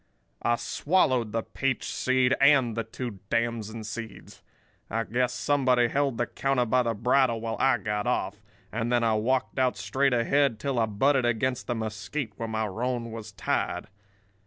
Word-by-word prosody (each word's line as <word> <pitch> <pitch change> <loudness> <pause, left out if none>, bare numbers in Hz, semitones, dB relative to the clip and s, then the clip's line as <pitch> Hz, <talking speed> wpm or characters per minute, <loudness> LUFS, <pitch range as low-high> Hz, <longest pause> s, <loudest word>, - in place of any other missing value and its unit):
"I 120 - +2
swallowed 130 - +1
the 115 0 -1
peach 135 -2 -2
seed 130 0 +2
and 135 -5 +5
the 115 - -1
two 115 -2 -6
damson 115 -1 -1
seeds. 110 +1 -8 0.5
I 115 +2 -1
guess 125 +2 0
somebody 125 -2 +2
held 140 -3 0
the 120 - +1
counter 135 -1 0
by 125 +2 +3
the 115 -2 -1
bridle 125 +1 +2
while 115 0 -3
I 135 -2 +4
got 105 +1 -2
off; 105 -4 -1 0.3
and 115 +2 -2
then 120 -1 +3
I 115 -1 +3
walked 125 +5 0
out 130 -1 +2
straight 135 0 +1
ahead 125 0 +2
till 135 0 -1
I 110 - +2
butted 130 +5 +2
against 120 +2 0
the 120 - -1
mesquite 110 +3 -4
where 115 - -3
my 110 0 -1
roan 115 +3 -3
was 110 -1 -7
tied. - - -2
120 Hz, 170 wpm, -27 LUFS, 110-130 Hz, 0.5 s, and